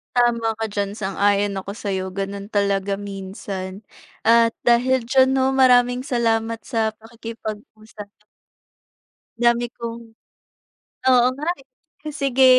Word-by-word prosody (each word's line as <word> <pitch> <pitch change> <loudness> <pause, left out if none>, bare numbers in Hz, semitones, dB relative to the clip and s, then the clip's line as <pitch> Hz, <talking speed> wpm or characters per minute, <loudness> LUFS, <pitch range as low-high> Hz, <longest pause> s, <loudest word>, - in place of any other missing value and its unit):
Tama 235 -2 +2
ka - - +1
diyan, 200 -1 -2
sang-ayon 200 0 +1
ako 195 +1 -5
sa'yo, 195 -3 -3
gano'n 200 +1 -4
talaga 200 -1 +1
minsan. 195 -1 -6 0.4
At 230 0 +4
dahil 250 +2 +3
diyan, 260 -1 +5
'no, 265 0 +2
maraming 250 -1 +4
salamat 230 -3 0
sa 220 -1 -1
pakikipag-usap. 220 -1 -9 1.3
Dami 235 0 +3
kong 235 0 -5 1.1
oo 245 -1 +5
nga, 300 +3 -5
eh. - - -23 0.5
Sige, 270 -2 +3
225 Hz, 110 wpm, -22 LUFS, 200-245 Hz, 1.3 s, diyan